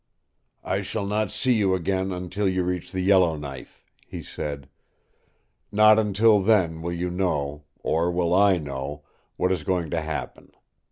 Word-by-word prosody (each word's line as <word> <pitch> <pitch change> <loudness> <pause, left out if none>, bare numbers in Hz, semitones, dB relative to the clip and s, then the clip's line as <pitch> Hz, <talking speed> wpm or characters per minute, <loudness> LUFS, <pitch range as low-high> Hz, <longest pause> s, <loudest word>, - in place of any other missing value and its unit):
"I 95 - -1
shall 100 +2 -3
not 105 0 0
see 130 +5 +1
you 100 -4 +2
again 95 +2 -1
until 95 +2 -2
you 95 -1 0
reach 90 -1 -3
the 95 - -2
Yellowknife," 80 -8 0 0.2
he - - -7
said. 70 -2 -6 1.0
"Not 110 +1 +6
until 105 0 +4
then 95 -6 +2
will 85 +1 -3
you 85 +1 -3
know 75 -6 -2 0.2
or 85 +2 +1
will 85 -1 0
I 100 0 +5
know 75 -1 -6 0.3
what 90 - +1
is 95 - -1
going 90 -5 -1
to 80 - 0
happen. 80 0 -6
90 Hz, 155 wpm, -25 LUFS, 80-100 Hz, 1.0 s, Not